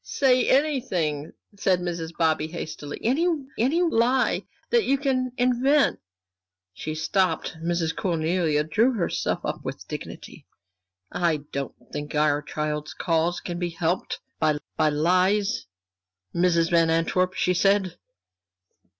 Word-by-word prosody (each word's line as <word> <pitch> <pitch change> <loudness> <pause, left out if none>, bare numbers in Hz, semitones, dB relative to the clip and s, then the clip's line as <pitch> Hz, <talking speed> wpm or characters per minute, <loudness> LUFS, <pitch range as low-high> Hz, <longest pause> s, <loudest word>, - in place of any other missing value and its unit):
"Say 255 -3 +2
anything," 215 - +1 0.3
said 185 -3 +2
Mrs. 170 -2 -3
Bobby, 160 -2 +2
hastily, 155 -3 -6
"any 275 +10 +2 0.3
any 290 +10 +2
lie 255 -4 +2 0.2
that 475 -2 +4
you 275 -5 +2
can 260 -2 0
invent." 255 +4 +3 0.7
She 155 +11 -5
stopped. 185 +1 0
Miss 170 -1 0
Cornelia 165 -3 0
drew 225 +12 +2
herself 195 -7 -1
up - - -3
with - - -6
dignity. - - -8 0.6
"I 165 -4 0
don't 140 0 -4 0.2
think 145 +1 -5
our 150 -1 +2
child's 150 0 -4
cause 165 +1 0
can 175 -1 -5
be 175 -1 -1
helped 170 +2 -2 0.2
by 155 -2 +2 0.2
by 155 -1 +3
lies, 185 - +2 0.7
Mrs. 170 -1 +2
Van 165 -1 +4
Antwerp," 180 +3 +1
she 180 - +1
said. 195 0 +2
175 Hz, 125 wpm, -25 LUFS, 160-230 Hz, 0.7 s, that